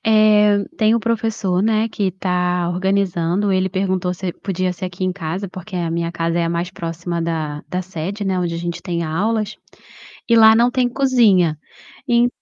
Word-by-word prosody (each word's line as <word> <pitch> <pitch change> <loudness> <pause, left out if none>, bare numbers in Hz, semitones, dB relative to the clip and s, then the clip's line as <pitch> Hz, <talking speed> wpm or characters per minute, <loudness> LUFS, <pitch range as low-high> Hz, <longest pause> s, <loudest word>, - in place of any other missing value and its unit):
eh, 210 -1 +5
tem 215 0 +3
o 235 - +2
professor, 220 -5 -1
né, 220 +1 +1
que 200 -3 -1
tá 180 -1 -1
organizando, 190 0 0
ele 190 0 +1
perguntou 185 -1 -1
se 180 0 -4
podia 185 -1 -2
ser 185 +1 -6
aqui 180 0 -5
em 185 - +1
casa, 180 +2 -4
porque 185 +1 -9
a 170 -2 -1
minha 170 0 -2
casa 165 0 -1
é 170 - +1
a 165 - -1
mais 170 +1 -2
próxima 170 -1 -4
da 155 -3 -3
da 180 - -2
sede, 185 +3 -5
né, 190 -2 0
onde 175 -1 -1
a - - -3
gente 170 0 -5
tem 170 -1 -2
aulas, 210 +6 -1 0.7
e 230 - +5
lá 220 -1 +8
não 235 +2 +4
tem 250 -1 +1
cozinha. 230 - +3 0.5
En 240 -1 +4
185 Hz, 190 wpm, -19 LUFS, 170-210 Hz, 0.7 s, lá